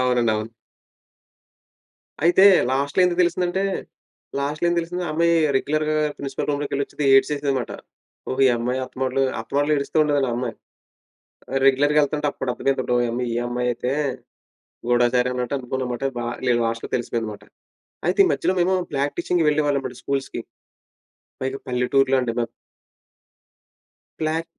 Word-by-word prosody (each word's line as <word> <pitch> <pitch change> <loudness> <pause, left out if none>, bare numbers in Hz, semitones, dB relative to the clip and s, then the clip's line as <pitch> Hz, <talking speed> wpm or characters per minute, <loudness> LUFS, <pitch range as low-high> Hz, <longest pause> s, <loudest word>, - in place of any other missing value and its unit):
అవునండి. 125 -2 +2
అవును. 110 +2 -4 1.7
అయితే 175 +3 +6 0.3
లాస్ట్‌లో 140 +6 +1
ఎందుకు 180 0 0
తెలిసిందంటే, 180 +2 0 0.8
లాస్ట్‌లో 150 +4 -2
ఏం 175 - +1
తెలిసింది. 175 +2 -4
ఆ - - -4
అమ్మాయి 170 +1 +3 0.2
రెగ్యులర్‌గా 155 +2 0 0.2
ప్రిన్సిపల్ 135 -1 -4
రూమ్‌లోకెళ్ళొచ్చిది 145 0 -2
ఏడ్సేసేది 140 0 +2
మాట. 120 - -5 0.6
ఓహో! 130 +1 -1
ఈ - - +4
అమ్మాయి 125 +2 -1
అత్తమాటులు 130 +1 -1 0.2
అత్తమాటులు 145 +6 0
ఏడుస్తూ 140 +3 -2
ఉండేదండి 145 -3 +1
ఆ - - -1
అమ్మాయి. 125 -2 -3 1.1
రెగ్యులర్‌గా 145 +3 +4
యెళ్తుంటే 150 +1 0
అప్పుడర్థమయిందండోయి. 125 -1 0
అమ్మో! 125 +1 -2
ఈ - - -3
అమ్మాయయితే 125 0 -1 1.0
గూడాచారి 120 +1 +3
అన్నట్టు 125 +1 -2
అనుకున్నా 130 0 -3
మాట. 120 - -4
బా 120 - -3 0.2
లే 125 - +4
లాస్ట్‌లో 115 0 -3
తెలిసిపోయింది 115 -2 -3
మాట. 105 0 -12 0.7
అయితే - - 0
ఈ - - +3
మధ్యలో 185 - 0
మేము 185 +2 +2 0.2
ప్రాక్టీసింగ్‌కి 155 +4 0
వెళ్ళేవాళ్ళమండి 145 -4 0
స్కూల్స్‌కి. 140 -1 -2 1.0
పైగా 135 +1 -3
పల్లెటూరులో 130 +2 +2
అండి 120 -2 -2
మాది. 120 -1 -1 1.7
బ్లాక్ 160 +1 0
135 Hz, 125 wpm, -23 LUFS, 125-150 Hz, 1.7 s, అయితే